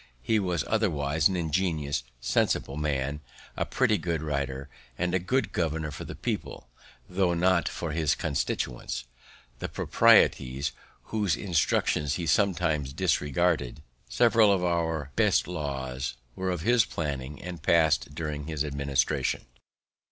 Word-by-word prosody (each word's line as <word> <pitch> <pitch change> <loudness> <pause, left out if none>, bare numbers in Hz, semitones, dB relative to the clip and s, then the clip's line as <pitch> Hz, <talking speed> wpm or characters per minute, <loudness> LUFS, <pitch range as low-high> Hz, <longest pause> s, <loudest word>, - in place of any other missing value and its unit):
He 110 -1 +2
was 90 -6 0
otherwise 80 -8 +2
an 95 - -2
ingenious, 80 -5 -1 0.2
sensible 70 - 0
man, 70 -1 -1 0.4
a - - -1
pretty - - +2
good 85 -3 -2
writer, 70 -2 -3 0.3
and 90 0 -1
a 95 - +3
good 130 +10 0
governor 80 -2 -1
for - - -7
the - - -7
people, 60 - -4 0.4
tho' 90 -1 +1
not 90 0 +2
for 85 - -4
his 80 -1 +1
constituents, 65 -5 -2 0.6
the - - -4
proprietaries, 65 +4 +3 0.4
whose 105 -6 +1
instructions 75 -5 +1
he 85 - -3
sometimes 80 -6 +1
disregarded. 75 -3 0 0.3
Several 115 -3 +5
of 95 -2 +1
our 80 -4 -1
best - - +3
laws 65 -7 -4 0.2
were 95 0 -2
of 90 -3 -2
his 120 +4 +4
planning 70 -5 -4
and 90 -1 -7
passed 80 -3 +2
during 75 -2 -4
his 75 -2 -2
administration. 70 -1 0
80 Hz, 130 wpm, -28 LUFS, 70-90 Hz, 0.6 s, Several